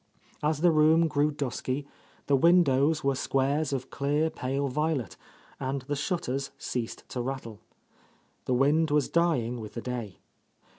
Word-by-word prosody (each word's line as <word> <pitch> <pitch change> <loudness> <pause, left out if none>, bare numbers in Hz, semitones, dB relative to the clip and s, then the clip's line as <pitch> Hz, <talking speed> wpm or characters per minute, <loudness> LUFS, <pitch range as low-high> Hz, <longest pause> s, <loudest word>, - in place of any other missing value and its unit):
As 150 0 0
the 175 0 +5
room 160 +2 +5
grew 150 -1 +2
dusky, 140 -1 -3 0.4
the 140 - +3
windows 150 -1 +4
were 140 0 +2
squares 135 +3 0
of 130 -2 -4
clear, 145 +3 0
pale 140 -1 -2
violet, 150 -1 -1 0.4
and 135 0 -3
the 145 +2 -3
shutters 140 -3 -2
ceased 120 -3 -5
to 125 - -3
rattle. 120 -4 -5 0.9
The 125 - +1
wind 150 +5 +3
was 145 -2 +2
dying 130 -9 +1
with 105 - -9
the 115 - -4
day. 120 -6 -5
140 Hz, 145 wpm, -28 LUFS, 130-155 Hz, 0.9 s, the